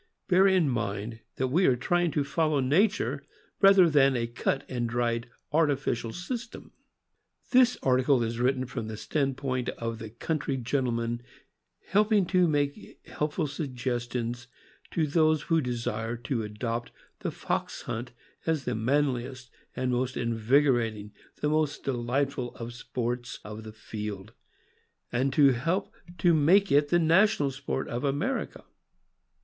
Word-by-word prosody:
Bear 190 +1 +5
in 185 -5 +4
mind 110 -2 -3 0.2
that 130 0 -1
we 175 +8 +3
are 130 - +4
trying 175 +7 +1
to 150 -2 0
follow 150 +1 +1
nature, 140 - +1 0.4
rather 195 -2 +7
than 140 -4 +4
a 120 -1 0
cut 130 +4 -1
and 120 -2 -2
dried 120 0 -1 0.2
artificial 140 -7 +1
system. 235 - -6 0.8
This 250 -1 +5
article 130 0 +3
is 115 +1 -3
written 130 +1 +1
from 120 -3 -5
the 110 -1 -6
stand 135 +1 -1
point 130 -3 -2
of 115 -1 -4
the 110 - -7
coun 155 +8 -2
try 140 - -2
gentleman 120 -2 -1 0.7
helping 210 0 +3
to 180 0 +3
make 145 -2 -2
helpful 150 +2 -2
suggestions 125 -4 -3 0.4
to 160 - 0
those 155 0 +2
who 165 -1 +2
desire 115 -2 -3
to 125 0 -2
adopt 115 +2 -4 0.3
the - - -2
fox - - -3
hunt 120 +2 -5 0.4
as 160 -4 0
the 125 - -1
manliest 130 +1 -1 0.2
and 130 0 -1
most 125 +1 -1
invigorating, 115 -2 +1 0.3
the 150 - +1
most 155 -1 0
delightful, 130 0 -1
of 115 0 -6
the - - -9
sports 125 0 -4
of 105 +1 -7
the 110 - -8
field, 105 -1 -7 0.8
and 130 +3 +1
to 140 -1 +6
help 165 +11 -1 0.2
to 175 -2 +4
make 180 +6 +4
it 145 +1 +4
the 175 - +4
national 165 -2 +3
sport 135 0 -3
of 120 +3 -4
America. 150 - -2
130 Hz, 145 wpm, -28 LUFS, 120-155 Hz, 0.8 s, rather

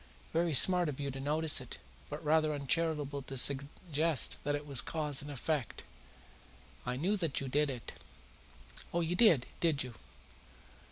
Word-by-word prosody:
Very 165 -2 +1
smart 180 +3 +5
of 140 - -6
you 140 -1 -2
to 135 - -7
notice 150 +1 +2
it, 125 - -9 0.3
but - - -7
rather 155 0 +3
uncharitable 145 0 -1
to 135 0 -7
suggest 145 +2 +1
that 145 0 0
it 145 0 -5
was 140 -4 +2
cause 150 -3 -1
and 145 - -8
effect." 145 -2 -3 1.0
"I 125 - -1
knew 180 +11 0
that 165 -7 -1
you 135 - -4
did 145 +3 +1
it." 125 -4 -6 1.0
"Oh, 170 - 0
you 170 +1 -1
did, 175 - +5
did 160 -5 +1
you? 125 -2 -8
145 Hz, 160 wpm, -33 LUFS, 135-160 Hz, 1.0 s, smart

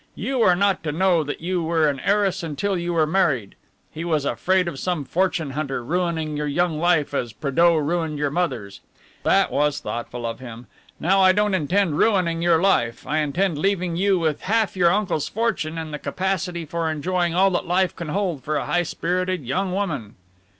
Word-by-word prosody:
You 265 -1 -2
were 185 -6 +5
not 200 0 +1
to 150 - 0
know 175 0 +2
that 145 +1 -5
you 180 +1 -1
were 160 -1 +2
an 140 -2 -1
heiress 200 +2 +1
until 175 +5 -2
you 175 0 -2
were 160 -2 +3
married. 155 - +1 0.4
He 160 - -6
was 155 -4 0
afraid 185 +9 +1
of 140 -6 -5
some 175 -4 -2
fortune 170 -3 0
hunter 135 -3 -3
ruining 165 0 -1
your 150 0 -2
young 160 +1 0
life 170 -4 +2
as 120 -5 -2
Prédeaux 165 +4 +2
ruined 160 0 -1
your 145 -1 -1
mother's. 140 - -2 0.4
That - - +3
was 150 0 +1
thoughtful 120 -3 -5
of 115 0 -4
him. 120 -1 -9 0.3
Now 195 +4 +3
I 185 0 +6
don't 210 0 +1
intend 180 -1 +1
ruining 180 -6 +2
your 170 -1 +4
life, 120 -11 +1
I 155 - 0
intend 155 +2 0
leaving 185 -2 0
you 195 +2 +2
with 160 -4 -1
half 220 0 0
your 175 -2 +4
uncle's 195 -6 0
fortune 205 -8 -1
and 160 -2 -5
the 150 - -4
capacity 185 -2 -2
for 165 +1 -2
enjoying 175 +2 -1
all 190 +1 +4
that 180 0 -1
life 185 +1 +1
can 170 -3 -6
hold 180 -6 -2
for 155 +2 -2
a - - -1
high 175 - +1
spirited 180 -1 -2
young 185 +9 -1
woman." 160 - -3
170 Hz, 195 wpm, -23 LUFS, 150-185 Hz, 0.4 s, I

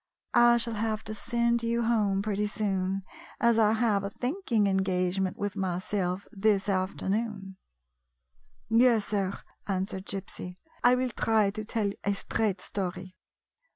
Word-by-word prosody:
I 240 0 +6
shall 230 0 -1
have 220 0 -2
to 215 - -5
send 235 +2 0
you 235 0 0
A - - 0
CONFIDENTIAL 230 -1 +2
TALK 205 - +1
home 195 - +1
pretty 210 0 0
soon, 195 -2 -1 0.4
as 235 -1 +4
I 215 -1 +5
have 220 -3 +2
a 200 - -2
thinking 245 - 0
engage 190 -1 +1
ment 190 +1 -1
with 205 -1 -3
myself 185 0 -2
this 200 -2 +1
afternoon." 195 +1 -2 0.6
" 65 0 -54 0.4
Yes, 230 -1 +4
sir," 195 -3 0 0.4
answered 190 -1 -3
Gypsy, 190 -2 -6
" - - -31
I 245 +1 +6
will 250 0 -1
try 215 -2 +2
to 215 +1 -5
tell 210 -1 -1
a 200 0 +1
straight 200 -2 -1
story. 185 -1 -5
205 Hz, 160 wpm, -28 LUFS, 190-225 Hz, 0.6 s, I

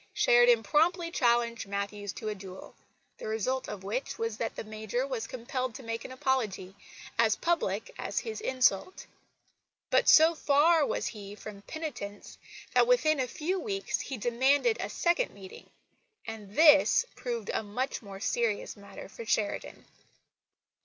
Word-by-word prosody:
Sheridan 240 -1 +5
promptly 335 - +2
challenged 235 -5 +1
Matthews 200 0 -4
to 220 - -7
a - - -2
duel, 190 -2 -10 0.5
the - - -6
result 225 +5 -1
of 195 -2 -7
which 225 +7 -3
was 230 -1 -2
that 225 - -3
the - - -5
Major 220 +3 -3
was 245 -5 -4
compelled 255 0 -4
to 265 - -9
make 230 0 -4
an - - -8
apology, 235 -8 -1 0.5
as 225 -2 +4
public 230 - -1
as - - -5
his 440 -1 -6
insult. 260 - +1 0.9
But, - - +4
so 320 +1 +7
far 305 +1 +4
was - - -2
he 205 -2 -6
from 210 -1 -10
penitence, 240 -8 -7 0.3
that - - +5
within 310 - +3
a 255 - 0
few 350 +9 -2
weeks 395 -3 -2
he 265 - -5
demanded 265 - +2
a - - -3
second 345 +8 0
meeting 190 -2 -12 0.6
and 215 -3 -8
this 315 +8 +6
proved 235 -4 -4
a - - 0
much 220 +6 -3
more 200 -3 -9
serious 225 0 -1
matter 200 -1 -11
for 470 - -9
Sheridan. - - -2
240 Hz, 155 wpm, -29 LUFS, 210-300 Hz, 0.9 s, so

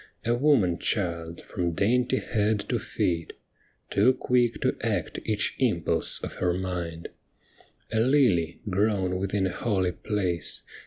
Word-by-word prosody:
A 115 - +2
woman 120 - +3
child 85 -5 -2
from 85 -3 -3
dainty 125 +8 +2
head 105 -3 0
to - - +1
feet, 85 -2 -2 0.6
Too 115 +6 +4
quick 120 -3 +1
to - - +1
act - - -2
each - - 0
impulse - - +2
of - - -6
her 90 -1 +2
mind. 90 -3 -4 0.8
A 110 - +2
lily 110 - +2
grown 95 -2 +1
within 95 +1 -1
a 95 - -1
holy 95 -6 0
place. 90 -3 -2
95 Hz, 135 wpm, -27 LUFS, 90-115 Hz, 0.8 s, Too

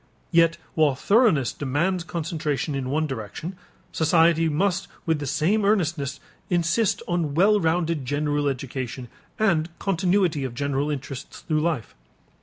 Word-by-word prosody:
Yet 165 -1 +4 0.2
while 150 -4 +3
thoroughness 200 - +3
demands 165 +7 -1
concentration 155 -3 -2
in 135 -2 -3
one 155 +3 +1
direction, 135 - -6 0.4
society 165 0 +3
must 190 +5 0 0.2
with 160 -3 +1
the 145 - -4
same 160 +10 +1
earnestness 160 -9 0 0.3
insist 175 +4 +1
on 170 -5 -1
well 205 +5 +5
rounded 165 -3 0
general 145 +2 0
education 130 -2 -4 0.3
and 175 -7 +2
continuity 180 -5 +1
of 125 -3 -4
general 140 +2 -1
interests 140 -2 -6
through 155 -2 0
life. 155 -8 -2
155 Hz, 130 wpm, -24 LUFS, 140-175 Hz, 0.4 s, well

